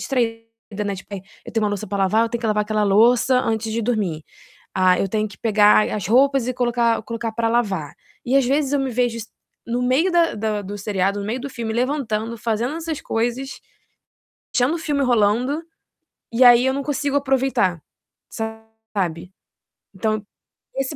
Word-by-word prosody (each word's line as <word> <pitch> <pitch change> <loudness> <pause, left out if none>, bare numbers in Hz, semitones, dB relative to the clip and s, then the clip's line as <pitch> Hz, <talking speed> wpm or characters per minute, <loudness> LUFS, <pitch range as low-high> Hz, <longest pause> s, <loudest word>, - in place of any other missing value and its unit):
distraída, 225 -4 -3
né, 200 -1 -2
tipo, 190 +2 -9
eh: 195 - -5 0.3
"Eu - - -8
tenho 225 -1 0
uma 210 - +1
louça 205 +1 -4
pra 200 +1 -3
lavar, 195 +3 +3
eu - - -2
tenho 235 -1 -3
que 230 - -2
lavar 210 0 +2
aquela 215 0 0
louça 235 +5 +4
antes 220 -1 -2
de 230 - -1
dormir". 205 -9 -1 0.5
"Ah, 185 -1 +4
eu 195 - 0
tenho 215 +2 -1
que 190 - -15
pegar 210 -1 +4
as 210 -4 -3
roupas 265 +1 +3
e 255 - -1
colocar 240 -2 +1
colocar 230 0 -4
para 230 0 0
lavar". 195 -11 -1 0.3
E 255 +3 +2
às 275 - +4
vezes 280 +1 +1
eu 285 - +2
me 265 -1 -1
vejo 245 -1 0
es 225 - -7 0.4
no 240 +1 -1
meio 265 +9 +2
da 340 -1 +3
da 210 -1 -2
do 205 +2 -7
seriado, 200 0 -1
no 200 - -5
meio 240 +4 -2
do 280 - -6
filme 230 -3 -4
levantando, 235 -3 -1
fazendo 235 +6 -1
essas 325 -2 -4
coisas, 240 +4 -2 0.9
deixando 255 +6 +2
o - - -6
filme 295 -3 -1
rolando, 245 +6 +2 0.7
e 240 +3 +4
aí 245 +1 +7
eu 265 - +2
não 280 +1 -2
consigo 285 0 -1
aproveitar, 265 - +1 0.5
sabe. 220 -6 -5 0.6
Então, 215 +2 -2 0.5
esse 270 +3 -2
225 Hz, 185 wpm, -21 LUFS, 210-255 Hz, 0.9 s, aí